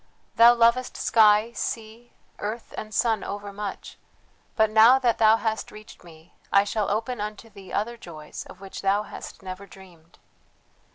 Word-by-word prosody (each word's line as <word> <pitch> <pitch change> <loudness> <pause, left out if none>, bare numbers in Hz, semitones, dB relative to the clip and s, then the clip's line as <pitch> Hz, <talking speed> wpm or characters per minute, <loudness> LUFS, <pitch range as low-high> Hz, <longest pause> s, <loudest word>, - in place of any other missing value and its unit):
"Thou 235 +1 +7
lovest 235 +2 +2
sky, 215 0 +4
sea, 225 +1 -6 0.3
earth, 220 +3 -6
and 215 - -7
sun 225 +1 0
overmuch, 205 0 -7 0.6
but 220 -1 +2
now 225 +4 +7
that 245 -3 0
thou 220 0 +5
hast 220 0 -3
reached 210 -2 -14
me 165 -1 -17 0.2
I 200 - +5
shall 205 0 -2
open 225 +2 -2
unto 210 +2 -7
thee 195 -2 -13
other 235 +3 -2
joys 155 -7 -9
of 185 - -14
which 195 -1 -8
thou 200 +2 +1
hast - - -10
never 190 +1 -8
dreamed. 175 -4 -17
215 Hz, 155 wpm, -25 LUFS, 195-230 Hz, 0.6 s, Thou